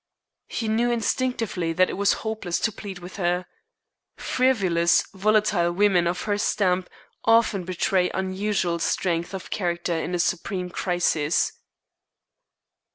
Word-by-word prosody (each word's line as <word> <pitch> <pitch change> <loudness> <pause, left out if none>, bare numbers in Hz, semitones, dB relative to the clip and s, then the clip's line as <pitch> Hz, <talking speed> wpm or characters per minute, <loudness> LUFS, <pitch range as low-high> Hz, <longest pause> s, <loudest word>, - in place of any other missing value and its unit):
He 225 - -3
knew 230 +3 +2
instinctively 230 -7 -1
that 185 +2 +3
it - - -5
was 200 +1 +2
hopeless 215 -6 -2
to 220 - +1
plead 200 -2 -8
with 180 +2 -10
her. 180 -1 0 0.7
Frivolous, 190 -10 +2
volatile 205 -3 +2
women 180 -2 +3
of 175 +1 -2
her 205 -1 -1
stamp 185 -4 +1 0.3
often 225 -5 +3
betray 185 0 +1
unusual 190 -2 -1
strength 170 0 -1
of 185 - -8
character 175 -2 -1
in 165 +2 -2
a - - -2
supreme 180 +1 -1
crisis. 175 -4 +1
185 Hz, 125 wpm, -24 LUFS, 175-210 Hz, 0.7 s, that